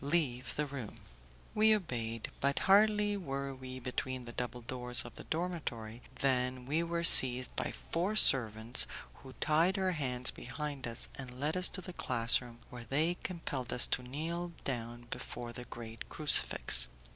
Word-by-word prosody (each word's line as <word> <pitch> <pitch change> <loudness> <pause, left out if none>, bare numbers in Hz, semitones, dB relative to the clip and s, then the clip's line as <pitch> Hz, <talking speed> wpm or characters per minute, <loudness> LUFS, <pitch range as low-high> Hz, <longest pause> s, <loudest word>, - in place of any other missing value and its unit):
Leave 140 -5 -2
the 150 - -1
room." 135 -6 -8 0.6
We 215 0 +4
obeyed; 115 - -5
but 140 0 -1
hardly 210 +1 +3
were 140 -7 -5
we 130 -1 -9
between 130 0 -5
the 120 - -9
double 125 0 -5
doors 125 +1 +1
of 120 - -11
the - - -12
dormitory 145 -10 -5
than 125 -1 -1
we 150 +5 -1
were 170 0 -3
seized 130 -5 +9
by - - -3
four 180 +6 -3
servants, 115 - +3 0.3
who 130 - -13
tied 165 +8 +1
our 190 -1 0
hands 125 -6 -1
behind 140 +1 -7
us, 115 -1 -5
and 130 -2 -10
led 150 +4 -2
us 185 0 +7
to 190 - -5
the 180 0 -10
class 120 -6 +1
room, 120 -1 -13
where 120 -1 -10
they 155 +7 0
compelled 145 -8 -5
us 125 - +3
to - - -2
kneel 165 +7 -5
down 120 -2 -6
before 120 -1 -6
the 125 +1 -9
great 115 -1 -10
crucifix. - - +3
130 Hz, 165 wpm, -32 LUFS, 120-165 Hz, 0.6 s, seized